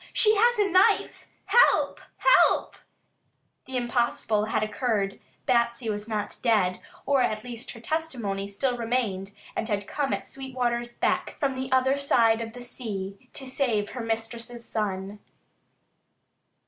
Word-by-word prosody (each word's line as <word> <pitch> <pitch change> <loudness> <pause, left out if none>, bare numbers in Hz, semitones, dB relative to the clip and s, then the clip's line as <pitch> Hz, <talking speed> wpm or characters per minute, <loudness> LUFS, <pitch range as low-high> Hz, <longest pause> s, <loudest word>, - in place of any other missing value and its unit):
She 430 -1 +5
has 475 +3 +4
a 415 -1 +3
knife. 375 0 +3 0.2
Help! 485 - +4 0.5
Help!" - - -2 0.9
The 260 -1 -3
impossible 235 -3 0
had 220 0 0
occurred. 210 -2 -1 0.3
Batsy 235 -1 +1
was 210 +1 -5
not 210 -2 -3
dead, 210 -7 +2 0.3
or 280 -2 +3
at 215 -3 0
least 240 -1 -7
her 235 - -11
testimony 235 -9 -2
still 245 +6 -1
remained 225 -5 -1 0.2
and 220 - -2
had 205 -1 -1
come 280 +3 -2
at - - -2
Sweetwater's 245 -3 -2
beck - - 0
from 275 -2 0
the 260 0 -4
other 260 +2 +3
side 230 -5 +3
of 225 -1 -6
the 245 - -9
sea 215 -3 -6
to 270 - -5
save 245 -6 0
her 250 - -5
mistress's 230 +1 -4
son. 200 -1 -3
235 Hz, 140 wpm, -26 LUFS, 215-260 Hz, 0.9 s, She